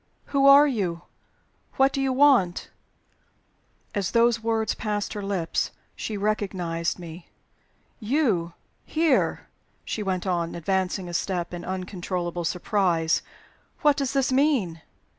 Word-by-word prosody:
"Who 275 0 +4
are 280 +1 +9
you? 185 -11 -2 0.7
What 270 0 +3
do 275 - -1
you 270 -1 +1
want?" 255 -10 +3 1.2
As 200 -3 -1
those 235 -1 +3
words 225 -1 0
passed 210 -1 -3
her 205 - -5
lips, 195 -4 -1 0.3
she 215 - -4
recognized 190 -5 -1
me. 170 -1 -10 0.7
"You 215 - 0 0.3
here!" 315 -4 +1 0.4
she 220 - -3
went 190 -2 -2
on, 170 -3 -1
advancing 185 +2 -1
a 175 - -7
step, 175 0 -2
in 175 - -6
uncontrollable 180 -2 -4
surprise. 175 -2 +1 0.6
"What 295 -1 +5
does 275 -2 -2
this 270 -2 +1
mean?" 255 - +1
200 Hz, 125 wpm, -25 LUFS, 175-250 Hz, 1.2 s, are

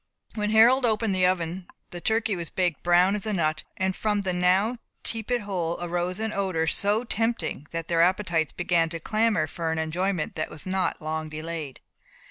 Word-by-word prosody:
When 210 -1 -1
Harold 235 +5 +6
opened 220 -3 +1
the 185 -1 +3
oven 175 0 -2 0.2
the 175 - -7
turkey 220 0 +1
was 170 -2 -5
baked 180 -4 -1
brown 175 +2 +4
as 210 0 -3
a 215 - 0
nut, 155 -4 0
and 190 0 0
from 210 -1 0
the 185 -2 -1
now 190 +7 +2 0.2
tepid 230 +2 -2
hole 180 -5 -2
arose 175 +2 -2
an 220 -1 -2
odour, 185 -5 0
so 205 +7 +1
tempting, 225 - -2
that 165 -1 -4
their 170 -1 +2
appetites 175 -3 +2
began 175 -2 +1
to 165 0 -5
clamour 215 -2 +1
for 160 +1 -3
an 160 - -1
enjoyment 170 +2 -1
that 155 - -3
was 155 - +1
not 185 -3 -1
long 155 0 -3
delayed. 155 -2 -6
180 Hz, 185 wpm, -26 LUFS, 165-210 Hz, 0.2 s, Harold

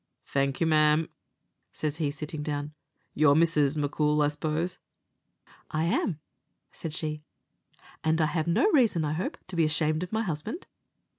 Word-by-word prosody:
"Thank 140 -1 0
you, 165 - +2
ma'am," 155 0 +3 0.6
says 150 0 -3
he, 155 -3 0
sitting 150 +1 -5
down; 150 0 -3 0.4
"you're 145 -1 +5
Mrs. 155 -3 +3
M'Coul, 150 +1 +1
I 145 - +3
suppose?" 155 +4 -2 0.9
"I 155 0 -1
am," 170 -1 0 0.5
said 165 - -6
she; 155 -1 -3 0.8
"and 160 +1 +2
I 155 - +4
have 160 +1 -1
no 170 - +3
reason, 225 - +3
I 150 - -1
hope, 175 +5 -3
to 185 - -8
be 165 - +3
ashamed 155 0 +1
of 180 - -5
my 220 +1 0
husband." 175 - -4
155 Hz, 155 wpm, -28 LUFS, 150-165 Hz, 0.9 s, you're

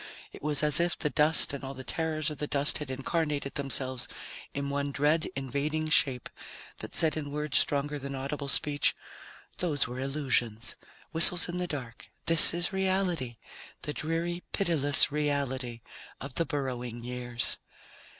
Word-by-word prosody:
It - - -13
was 150 0 -1
as 150 +1 +4
if 175 0 -1
the 150 - -2
dust 150 +2 +5
and 140 - -7
all 135 +1 -7
the 130 - -9
terrors 155 +1 -3
of 150 - -8
the 150 - -3
dust 145 +1 +3
had 150 -3 -7
incarnated 145 +1 -3
themselves 130 -2 0 0.4
in 140 0 -5
one 140 0 -3
dread 150 +3 0
invading 145 +4 -3
shape 130 -5 +2 0.5
that - - -8
said 160 -1 +3
in 150 -2 -5
words 150 0 0
stronger 145 +1 -2
than 140 0 -7
audible 140 +2 -5
speech, 145 0 +1 0.6
"Those 155 -6 0
were 125 +2 -7
illusions, 130 -5 -1 0.4
whistles 170 +2 +8
in 175 0 -5
the 180 - -3
dark. 125 -7 -8 0.2
This 165 -1 +8
is 175 +2 +2
reality, 185 -10 -2 0.5
the 150 - -4
dreary, 165 +3 -3
pitiless 150 -9 +4
reality 135 -5 -3 0.4
of 140 0 -8
the 165 - -1
Burrowing 125 -5 -5
Years." 120 -1 0
145 Hz, 155 wpm, -28 LUFS, 135-155 Hz, 0.6 s, whistles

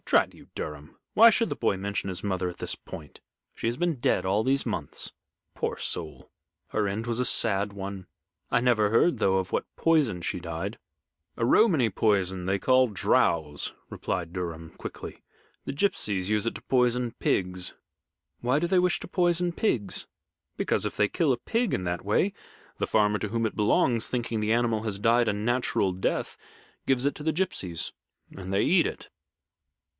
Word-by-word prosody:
"Drat - - +3
you, - - -16
Durham! 75 0 -7 0.2
why 230 +2 +9
should 230 0 +2
the - - -3
boy 105 -4 0
mention 100 0 -3
his 90 - -4
mother 95 -3 -1
at 90 - -9
this - - -2
point? 75 -4 -11 0.3
She - - -3
has 120 +1 -1
been 175 0 +1
dead 120 - +1
all 100 +3 +2
these 135 +3 +1
months. 90 - -2 0.4
Poor - - -2
soul! - - -3 0.4
her 110 - 0
end 105 +3 -3
was 120 +1 0
a - - +1
sad 100 -4 +2
one. 100 -1 -6 0.4
I - - +3
never 115 -4 +3
heard, 115 +10 +3
though, 95 0 +3
of 95 -1 -3
what - - -2
poison 145 - +2
she 85 - -3
died." 85 +5 -5 0.6
"A 115 - +1
Romany 155 - +4
poison 95 -3 +1
they 95 +1 0
call 130 +2 +4
drows," 80 - +1 0.2
explained 85 -1 -3
Durham, 85 -3 -5
quickly. - - -8 0.4
"The - - -4
gipsies 105 - 0
use 105 0 +1
it 115 - -1
to - - -7
poison 125 -1 +2
pigs." 90 -1 -1 0.7
"Why 125 +4 +2
do 170 - 0
they 185 +1 +3
wish 180 -2 +2
to - - -6
poison 175 -1 +1
pigs?" 115 - -1 0.5
"Because, - - 0
if - - -3
they 105 - +4
kill 155 - +1
a 125 - +1
pig 230 - -1
in 90 - -1
that 90 -1 -2
way, 110 - +1 0.5
the - - 0
farmer 105 -1 +2
to 105 - -3
whom 115 +1 0
it 110 - -2
belongs, 110 +2 +2
thinking 120 -2 -2
the 105 +1 0
animal 115 -2 +2
has 105 -3 -3
died 115 +3 +3
a - - +1
natural 105 -3 0
death, 95 - -2 0.5
gives 130 -1 +2
it 145 - +1
to 150 - -8
the 160 - +2
gipsies 95 - -2 0.4
and 95 -1 -7
they 100 +1 +2
eat 175 +1 +4
it." - - -7
110 Hz, 185 wpm, -27 LUFS, 95-130 Hz, 0.7 s, why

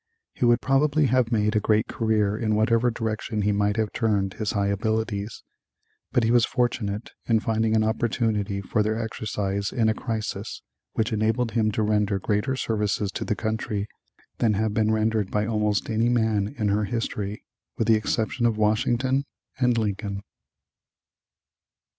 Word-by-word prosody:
He - - 0
would 120 0 +4
probably 145 +3 +3
have 130 -3 +2
made 105 -1 +1
a - - +4
great 110 +1 +2
career 105 -3 +1
in 110 -1 0
whatever 115 +3 +3
direction 110 -2 -2
he 105 - +2
might 105 +1 +1
have 110 -2 -1
turned 100 -4 0
his 110 -2 -2
high 100 -1 +1
abilities, 110 +1 -2 0.7
but 120 - +2
he 115 - +2
was 120 -1 +5
fortunate 115 -4 -1 0.2
in 115 -2 +3
finding 110 0 +1
an 110 - +3
opportunity 110 -3 0
for 105 +3 0
their 110 +1 0
exercise 100 -3 -2
in 110 -2 +2
a - - +2
crisis 110 -3 -4 0.3
which 110 +1 0
enabled 110 +2 +1
him 110 -1 +1
to 110 - 0
render 105 -1 +1
greater 105 +6 0
services 105 -4 -1
to - - -4
the 105 - -1
country 110 -1 -2 0.5
than 110 -3 +3
have 110 +1 0
been 110 0 +2
rendered 110 -2 +1
by 105 0 0
almost 105 -2 0
any 115 +1 +1
man 110 -4 +1
in 105 -3 0
her 105 +1 +1
history, 105 -2 -3 0.3
with 115 - 0
the 115 - +6
exception 110 +2 +1
of 110 -2 0
Washington 120 +5 +1 0.3
and 125 -2 +3
Lincoln. 100 -2 -2
110 Hz, 165 wpm, -25 LUFS, 105-115 Hz, 0.7 s, the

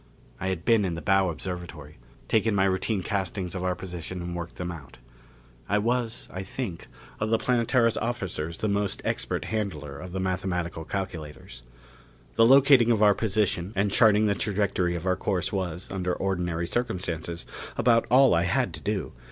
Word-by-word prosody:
I 95 - -3
had 95 -3 -3
been 115 -3 +4
in 90 -3 -1
the 85 - -6
bow 95 +1 +3
observatory; 80 -4 -6 0.3
taken 110 -1 +2
my 95 - +3
routine 95 +1 0
castings 95 -2 -2
of 90 -1 -4
our 90 -1 0
position 90 0 -6
and 85 0 -5
worked 85 0 -6
them 90 -1 -4
out. 75 -5 -11 0.7
I 105 - +3
was, 115 +1 -1
I 95 - -4
think, 95 -2 -5 0.3
of 105 - -1
the 115 - +3
Planetara's 115 0 +2
officers 95 -9 -3
the 110 - -1
most 100 -1 0
expert - - -2
handler 75 -11 -3
of 90 +2 -8
the 95 - -3
mathematical 90 -3 -2
calculators. 80 -10 -6 0.7
The 115 - +5
locating 135 -2 +7
of 110 -2 +3
our 105 -1 +7
position 100 -2 0
and 100 +1 +1
charting 110 -1 +5
the 105 - +3
trajectory 100 -4 0
of 85 +1 -5
our 95 -1 +2
course 95 0 -1
was, 90 -2 -3
under 90 -2 -1
ordinary 90 -3 -1
circumstances, 85 -6 -3 0.3
about 115 -1 +3
all 130 +2 +6
I 85 +1 +3
had 85 - +1
to - - -7
do. - - -2
95 Hz, 175 wpm, -27 LUFS, 85-110 Hz, 0.7 s, locating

